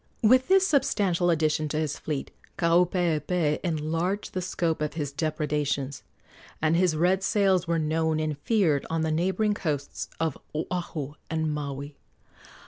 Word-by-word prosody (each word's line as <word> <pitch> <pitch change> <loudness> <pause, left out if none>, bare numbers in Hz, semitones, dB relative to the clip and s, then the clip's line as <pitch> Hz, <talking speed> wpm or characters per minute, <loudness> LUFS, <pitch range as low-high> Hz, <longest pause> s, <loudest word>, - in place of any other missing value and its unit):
With 255 +4 +5
this 385 0 +5
substantial 195 - +2
addition 155 -2 +1
to 150 - -2
his 155 -2 -2
fleet 150 -3 -4 0.3
Kaupeepee 170 -2 +2
enlarged 165 +4 -1
the 185 - -2
scope 170 -3 -1
of 150 +1 -2
his 145 -4 -3
depredations, 150 -2 -2 0.6
and 155 +1 +2
his 175 -2 +3
red 180 +4 +2
sails 190 -3 +2
were 170 0 +1
known 160 0 0
and 155 -1 -1
feared 165 -6 +2
on 165 0 0
the 160 0 0
neighboring 190 +6 +1
coasts 150 -8 -3
of 160 -4 -1 0.2
Oahu 155 -3 -3 0.2
and 160 -1 -1
Maui. 140 -1 -5
160 Hz, 140 wpm, -27 LUFS, 150-180 Hz, 0.6 s, With